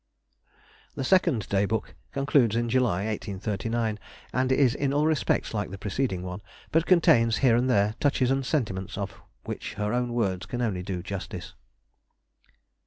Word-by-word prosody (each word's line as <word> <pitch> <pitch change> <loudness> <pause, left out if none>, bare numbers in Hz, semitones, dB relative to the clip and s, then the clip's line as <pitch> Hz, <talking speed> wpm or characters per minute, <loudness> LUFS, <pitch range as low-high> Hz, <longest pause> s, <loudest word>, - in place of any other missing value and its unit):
The - - -3
second 140 - +2
Day 100 0 +2
Book 110 +1 -2 0.2
concludes 140 -5 +2
in 120 0 0
July, 110 -6 +1
1839, 110 +1 -2 0.3
and 130 +1 +1
is 130 -2 +4
in 140 -1 -1
all 145 +1 +2
respects 155 -6 +1
like 105 -3 -2
the 100 - -7
preceding 100 -1 -2
one, 90 +2 -6 0.3
but 165 +2 +2
contains 115 - +5
here 120 -3 +6
and 125 +2 +2
there 105 -2 +3
touches 135 -3 +2
and 135 0 +1
sentiments 100 - -2
of 100 -2 -5 0.2
which - - -6
her 105 +2 -1
own 125 -1 0
words 95 -6 -1
can 120 - -4
only 100 -6 -1
do 90 -2 -4
justice. 100 -1 -6
115 Hz, 160 wpm, -27 LUFS, 100-130 Hz, 0.3 s, here